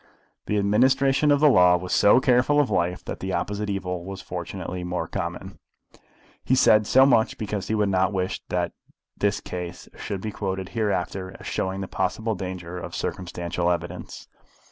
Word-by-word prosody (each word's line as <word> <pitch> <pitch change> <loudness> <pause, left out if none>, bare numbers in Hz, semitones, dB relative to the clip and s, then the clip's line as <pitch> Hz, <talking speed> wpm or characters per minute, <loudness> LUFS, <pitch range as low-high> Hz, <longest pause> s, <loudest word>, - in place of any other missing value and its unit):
The 105 - 0
administration 130 +8 +3
of 145 0 +4
the 155 - +7
law 90 -9 +6
was 90 +1 -5
so 105 +4 +6
careful 130 +3 +3
of 145 - +2
life 90 +1 0
that - - -5
the 95 0 -3
opposite 105 0 -2
evil 90 -3 -3
was 95 +1 -7
fortunately 90 -1 -6
more 90 -2 -3
common. - - -5 0.8
He 130 - +2
said 110 -4 +5
so 130 +1 +6
much 115 -5 +3
because 105 -2 -4
he 110 - 0
would 105 -1 +2
not 95 0 +2
wish 95 -2 -2
that - - -1 0.4
this 100 0 0
case 90 -1 -7
should 100 -2 -5
be 110 - -4
quoted 95 -2 -4
hereafter 95 -4 -2
as - - -12
showing 95 +1 -2
the 95 - -4
possible 110 +5 -1
danger 90 -2 -6
of - - -7
circumstantial 85 -1 -2
evidence. 85 0 -4
95 Hz, 170 wpm, -25 LUFS, 90-110 Hz, 0.8 s, the